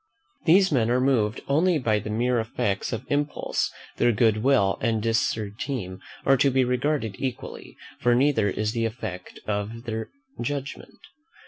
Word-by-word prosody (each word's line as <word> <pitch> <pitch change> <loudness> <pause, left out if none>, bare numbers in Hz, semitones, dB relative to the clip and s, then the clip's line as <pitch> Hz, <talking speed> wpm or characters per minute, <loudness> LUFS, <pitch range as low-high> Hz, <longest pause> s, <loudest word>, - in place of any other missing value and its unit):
These 190 +3 +6
men 120 -5 +2
are 125 +1 +3
moved 120 -5 +1
only 165 +5 +3
by 110 -6 +1
the 105 - -6
mere 120 +3 +1
effects 105 -3 -2
of 115 +2 -4
impulse: 145 +1 0 0.3
their 120 - +4
good 110 -1 +3
will 110 -5 +2
and 115 -1 +1
disesteem 110 -1 -2 0.3
are 135 - +5
to 140 +2 +4
be 130 -1 +2
regarded 125 -4 -1
equally, 130 -3 -5 0.2
for 120 0 +3
neither 125 -5 +3
is 105 +2 -1
the 115 0 -1
effect 100 -6 -6
of 105 +3 -3
their 110 -1 -4 0.3
judgment. 140 -2 -5
115 Hz, 150 wpm, -25 LUFS, 110-135 Hz, 0.3 s, These